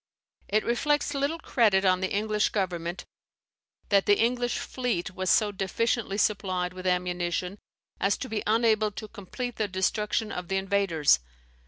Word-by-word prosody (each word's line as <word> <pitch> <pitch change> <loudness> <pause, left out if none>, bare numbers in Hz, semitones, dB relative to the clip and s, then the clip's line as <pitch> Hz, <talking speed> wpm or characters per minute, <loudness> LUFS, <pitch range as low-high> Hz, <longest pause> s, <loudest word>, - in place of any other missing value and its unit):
It 215 +2 +1
reflects 290 +5 +1
little 280 +3 -1
credit 215 -11 +2
on 185 0 +3
the 190 - -1
English 210 +1 +1
Government 175 -3 -3 0.8
that 200 -1 +3
the 205 - +5
English 245 +1 +1
fleet 235 -9 -2
was 185 0 -3
so 210 +2 +4
deficiently 200 +2 -1
supplied 185 -4 0
with 185 0 -5
ammunition, 180 +1 -1 0.4
as 200 - +2
to 260 - -5
be 220 -3 -2
unable 220 -1 +3
to 215 - -7
complete 230 +4 -6
the 215 - 0
destruction 210 +3 -1
of 180 -1 -5
the 195 - 0
invaders. 190 - +2
200 Hz, 150 wpm, -27 LUFS, 185-225 Hz, 0.8 s, the